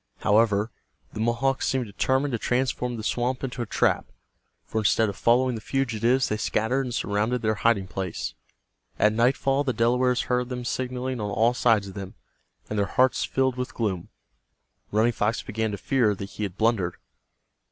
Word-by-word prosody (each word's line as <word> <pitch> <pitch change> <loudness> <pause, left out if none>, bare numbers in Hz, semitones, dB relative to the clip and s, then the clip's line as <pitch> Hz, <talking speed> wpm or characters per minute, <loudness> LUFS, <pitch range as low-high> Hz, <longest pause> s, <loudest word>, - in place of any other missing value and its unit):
However, 105 0 +3 0.4
the - - -6
Mohawks 120 +4 +1
seemed 130 -2 0
determined 130 +7 0
to 120 - -1
transform 125 0 -1
the 110 - -6
swamp 125 +3 -1
into 125 -2 -3
a 120 - -3
trap, - - +1 0.6
for 110 - -2
instead 110 +1 +3
of 100 - -5
following 125 +3 +3
the 110 - -5
fugitives 130 0 +1
they 105 - -1
scattered 125 +5 0
and - - -5
surrounded 110 +4 0
their 110 0 +2
hiding 115 -5 +3
place. 95 -2 -4 0.6
At 105 0 +4
nightfall 135 +4 +2
the 130 -3 0
Delawares 125 +2 +2
heard 125 0 -1
them 125 -1 -4
signaling 125 -1 -3
on 105 - -2
all 115 +4 +2
sides 115 -5 +2
of - - -10
them, 95 -2 -7 0.5
and 105 - -2
their 100 - +1
hearts 130 +6 +2
filled 130 -1 0
with 125 0 -4
gloom. 95 -7 -2 0.8
Running 110 +3 +3
Fox 110 +2 0
began 110 -2 -2
to 100 - -4
fear 115 -1 +1
that 100 - -6
he - - -8
had 100 -2 -3
blundered. 110 -6 +1
115 Hz, 175 wpm, -25 LUFS, 105-125 Hz, 0.8 s, At